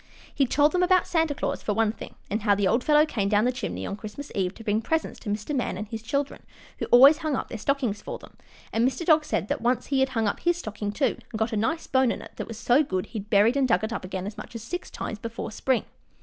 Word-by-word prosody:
] -, -, -22 dB
He 275 Hz, -3 st, +2 dB
told 290 Hz, +4 st, +3 dB
them 360 Hz, -, +1 dB
about 365 Hz, 0 st, +4 dB
Santa 325 Hz, -4 st, +1 dB
Claus, -, -, -2 dB
for 210 Hz, -, -1 dB
one 220 Hz, -1 st, +2 dB
thing, -, -, -10 dB
and 210 Hz, +3 st, -2 dB
how 205 Hz, -1 st, +3 dB
the 200 Hz, -1 st, +1 dB
old 235 Hz, +6 st, +2 dB
fellow 300 Hz, 0 st, +5 dB
came 205 Hz, -10 st, -1 dB
down 210 Hz, +2 st, +3 dB
the 250 Hz, -, +3 dB
chimney 255 Hz, -, -4 dB
on -, -, -3 dB
Christmas 215 Hz, +7 st, -8 dB
Eve 185 Hz, -1 st, -1 dB
to 225 Hz, -, -11 dB
bring 215 Hz, +1 st, +1 dB
presents 320 Hz, +7 st, -2 dB
to -, -, -7 dB
Mr. 210 Hz, +8 st, -2 dB
Man 245 Hz, -7 st, -1 dB
and 210 Hz, +2 st, -5 dB
his 225 Hz, -1 st, -5 dB
children, 280 Hz, +5 st, -2 dB, 0.4 s
who -, -, -2 dB
always 275 Hz, +6 st, +8 dB
hung 310 Hz, -4 st, -1 dB
up -, -, -4 dB
their 230 Hz, -, -5 dB
stockings 245 Hz, -5 st, -1 dB
for -, -, -6 dB
them, -, -, -16 dB, 0.4 s
and 225 Hz, -, +2 dB
Mr. 260 Hz, +6 st, 0 dB
Dog 310 Hz, -2 st, +5 dB
said 200 Hz, -, -1 dB
that -, -, -2 dB
once 245 Hz, +1 st, +1 dB
he 275 Hz, -1 st, 0 dB
had 265 Hz, 0 st, +3 dB
hung 225 Hz, -4 st, 0 dB
up 200 Hz, -, -1 dB
his 345 Hz, 0 st, +1 dB
stocking, 215 Hz, -8 st, -4 dB
too, 270 Hz, +6 st, 0 dB
and 220 Hz, -, -4 dB
got 220 Hz, +1 st, -1 dB
a -, -, +1 dB
nice 315 Hz, +11 st, 0 dB
bone 260 Hz, -2 st, +3 dB
in -, -, -5 dB
it, -, -, -12 dB
that -, -, -5 dB
was 225 Hz, -, -7 dB
so 245 Hz, +5 st, +4 dB
good 185 Hz, -10 st, -2 dB
he 225 Hz, -, -6 dB
had 205 Hz, +1 st, -10 dB
buried 215 Hz, +4 st, +4 dB
and 275 Hz, -2 st, +2 dB
dug 190 Hz, -4 st, +2 dB
it 220 Hz, +1 st, -2 dB
up -, -, -4 dB
again 185 Hz, 0 st, -4 dB
as 210 Hz, +1 st, -6 dB
much 220 Hz, -, -10 dB
as 225 Hz, -, -6 dB
six 355 Hz, +9 st, -5 dB
times 215 Hz, -, -5 dB
before 230 Hz, 0 st, -5 dB
spring. 250 Hz, +3 st, 0 dB
230 Hz, 290 wpm, -26 LUFS, 210-280 Hz, 0.4 s, always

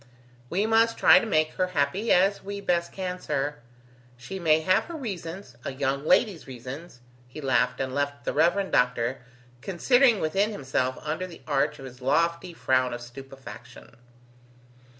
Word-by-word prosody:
"We 195 Hz, +5 st, 0 dB
must 225 Hz, +1 st, +3 dB
try -, -, +7 dB
to 230 Hz, -, -4 dB
make 155 Hz, -5 st, +2 dB
her 185 Hz, -1 st, 0 dB
happy 145 Hz, +11 st, +1 dB
as 195 Hz, +3 st, +3 dB
we 200 Hz, +1 st, -5 dB
best 175 Hz, -3 st, 0 dB
can, 185 Hz, -1 st, -4 dB
sir. 145 Hz, -2 st, -2 dB, 0.6 s
She 155 Hz, +11 st, -7 dB
may 160 Hz, -2 st, +3 dB
have 185 Hz, +3 st, +2 dB
her 340 Hz, -, -8 dB
reasons 190 Hz, -, -6 dB
a -, -, -3 dB
young 140 Hz, +2 st, -2 dB
lady's 190 Hz, -11 st, +2 dB
reasons!" 130 Hz, +3 st, -9 dB, 0.3 s
He 125 Hz, +5 st, -10 dB
laughed, 130 Hz, -2 st, +1 dB
and 130 Hz, -1 st, -2 dB
left 140 Hz, -2 st, -2 dB
the -, -, -1 dB
Rev. 175 Hz, +6 st, +2 dB
Doctor 125 Hz, 0 st, +1 dB, 0.4 s
considering 235 Hz, -, +3 dB
within 195 Hz, +7 st, +1 dB
himself 130 Hz, -7 st, -2 dB
under 160 Hz, +5 st, -3 dB
the 170 Hz, -, -13 dB
arch 150 Hz, 0 st, 0 dB
of 135 Hz, -, -10 dB
his 125 Hz, -1 st, -11 dB
lofty 170 Hz, +6 st, +1 dB
frown 130 Hz, -6 st, +1 dB
of 120 Hz, -, -8 dB
stupefaction. 120 Hz, -2 st, -12 dB
155 Hz, 160 wpm, -26 LUFS, 130-190 Hz, 0.6 s, try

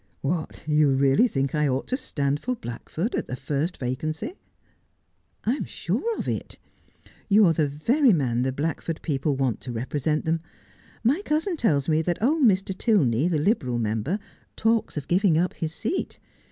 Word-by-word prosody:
' -, -, -40 dB
What, 155 Hz, +3 st, -3 dB
you 150 Hz, -1 st, +4 dB
really 135 Hz, -, +4 dB
think 135 Hz, -, -1 dB
I 150 Hz, -1 st, +2 dB
ought 130 Hz, 0 st, 0 dB
to 255 Hz, -, +1 dB
stand 145 Hz, -, -1 dB
for 250 Hz, +8 st, -2 dB
Blackford 165 Hz, -, -4 dB
at -, -, -2 dB
the 125 Hz, -, -4 dB
first 145 Hz, +6 st, -2 dB
vacancy'!' 155 Hz, -, -3 dB, 0.6 s
' -, -, -45 dB
I 230 Hz, -, +3 dB
am 285 Hz, -, -3 dB
sure 460 Hz, -1 st, -2 dB
of -, -, -4 dB
it. -, -, -3 dB, 0.7 s
You 210 Hz, +1 st, +6 dB
are 165 Hz, -, +4 dB
the 155 Hz, -2 st, +1 dB
very 235 Hz, -, +3 dB
man 125 Hz, -, +1 dB
the 130 Hz, +1 st, +1 dB
Blackford 160 Hz, +3 st, -3 dB
people 145 Hz, -1 st, 0 dB
want 130 Hz, -3 st, -1 dB
to 125 Hz, -, -6 dB
represent 145 Hz, +6 st, -1 dB
them. 160 Hz, 0 st, 0 dB, 0.6 s
My 275 Hz, -, +3 dB
cousin 320 Hz, +4 st, 0 dB
tells 150 Hz, -, +1 dB
me 160 Hz, -1 st, +3 dB
that 175 Hz, +1 st, -1 dB
old 300 Hz, +8 st, +2 dB
Mr. 195 Hz, -4 st, +3 dB
Tilney, 160 Hz, -, +2 dB
the 170 Hz, -3 st, +1 dB
Liberal 150 Hz, -, +1 dB
member, 115 Hz, -, -1 dB, 0.4 s
talks 225 Hz, -6 st, +1 dB
of 145 Hz, -, -4 dB
giving 180 Hz, -2 st, +3 dB
up 180 Hz, +2 st, +1 dB
his 160 Hz, -1 st, -3 dB
seat. 225 Hz, -, -3 dB
155 Hz, 180 wpm, -25 LUFS, 135-210 Hz, 0.7 s, You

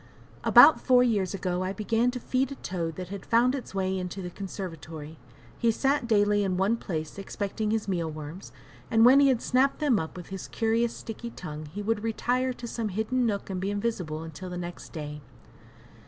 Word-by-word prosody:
About -, -, +8 dB
four 250 Hz, -1 st, +5 dB
years 205 Hz, -6 st, +1 dB
ago 180 Hz, -1 st, -2 dB
I 185 Hz, +1 st, -2 dB
began 225 Hz, +4 st, +1 dB
to 250 Hz, 0 st, -4 dB
feed 255 Hz, +2 st, 0 dB
a -, -, -4 dB
toad 170 Hz, -8 st, -4 dB
that 180 Hz, -1 st, -6 dB
had 200 Hz, -1 st, -6 dB
found 240 Hz, +2 st, +3 dB
its 255 Hz, -7 st, -6 dB
way 190 Hz, 0 st, 0 dB
into 185 Hz, +1 st, -4 dB
the 180 Hz, -, -5 dB
conservatory. 165 Hz, -5 st, -7 dB, 0.4 s
He 235 Hz, -, +3 dB
sat 270 Hz, +3 st, +1 dB
daily 205 Hz, -2 st, +3 dB
in 185 Hz, -2 st, 0 dB
one 200 Hz, +5 st, +2 dB
place 160 Hz, -3 st, -5 dB
expecting 205 Hz, +2 st, -3 dB
his 220 Hz, -1 st, 0 dB
meal 170 Hz, -4 st, -1 dB
worms, 155 Hz, +4 st, -8 dB, 0.4 s
and 225 Hz, -1 st, +5 dB
when 260 Hz, +3 st, +8 dB
he 280 Hz, -, +6 dB
had 255 Hz, -4 st, +2 dB
snapped 260 Hz, +2 st, +2 dB
them 280 Hz, -9 st, +2 dB
up 160 Hz, +2 st, -5 dB
with 180 Hz, -, -9 dB
his 195 Hz, -1 st, -6 dB
curious 230 Hz, +1 st, 0 dB
sticky 235 Hz, +1 st, -7 dB
tongue 155 Hz, -7 st, -7 dB
he 200 Hz, +8 st, -6 dB
would 220 Hz, 0 st, 0 dB
retire 250 Hz, +3 st, 0 dB
to 245 Hz, -1 st, -8 dB
some 230 Hz, -2 st, -3 dB
hidden 220 Hz, +5 st, 0 dB
nook 200 Hz, -2 st, -2 dB
and 185 Hz, -1 st, -3 dB
be 195 Hz, -, -1 dB
invisible 200 Hz, -7 st, -2 dB
until 165 Hz, +3 st, -8 dB
the 180 Hz, -, -5 dB
next 175 Hz, 0 st, -7 dB
day. 150 Hz, -2 st, -6 dB
200 Hz, 200 wpm, -28 LUFS, 180-235 Hz, 0.4 s, About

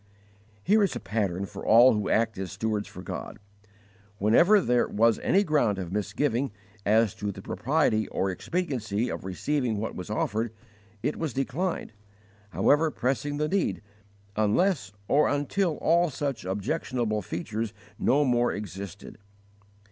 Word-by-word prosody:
_ -, -, -32 dB, 0.6 s
Here 210 Hz, +4 st, +4 dB
is 200 Hz, -, +1 dB
a -, -, -3 dB
pattern 100 Hz, -3 st, -2 dB
for 100 Hz, 0 st, -9 dB
all 120 Hz, +4 st, +7 dB
who 105 Hz, -1 st, -1 dB
act 115 Hz, 0 st, +2 dB
as 95 Hz, -2 st, -4 dB
stewards 105 Hz, +1 st, -2 dB
for 90 Hz, -, -10 dB
God. -, -, -6 dB, 0.8 s
Whenever 165 Hz, -, +5 dB
there 125 Hz, -8 st, +2 dB
was 115 Hz, +1 st, +3 dB
any 195 Hz, +2 st, +3 dB
ground 145 Hz, -, +2 dB
of 90 Hz, -3 st, -5 dB
misgiving 115 Hz, +6 st, -1 dB, 0.4 s
as 110 Hz, 0 st, +4 dB
to 105 Hz, -1 st, -3 dB
the 95 Hz, 0 st, -10 dB
propriety 130 Hz, -6 st, +1 dB
or 95 Hz, -, -1 dB
expediency 120 Hz, -, -2 dB
of -, -, -5 dB
receiving 120 Hz, +4 st, -1 dB
what 110 Hz, +2 st, -3 dB
was 90 Hz, -, -7 dB
offered, 110 Hz, +1 st, -1 dB, 0.5 s
it 150 Hz, -, -1 dB
was 160 Hz, -6 st, -3 dB
declined, 140 Hz, -, -2 dB, 0.6 s
however 145 Hz, -, +3 dB
pressing 145 Hz, +2 st, -1 dB
the 150 Hz, +1 st, 0 dB
need, 190 Hz, -, 0 dB, 0.5 s
unless 110 Hz, -, +1 dB, 0.2 s
or 150 Hz, -, +4 dB
until 155 Hz, +4 st, 0 dB
all 170 Hz, +1 st, +3 dB
such 140 Hz, -7 st, -3 dB
objectionable 110 Hz, -, -1 dB
features 105 Hz, +5 st, -4 dB, 0.3 s
no 145 Hz, +2 st, +3 dB
more 120 Hz, -1 st, +2 dB
existed. 100 Hz, 0 st, -7 dB
115 Hz, 145 wpm, -27 LUFS, 105-145 Hz, 0.8 s, all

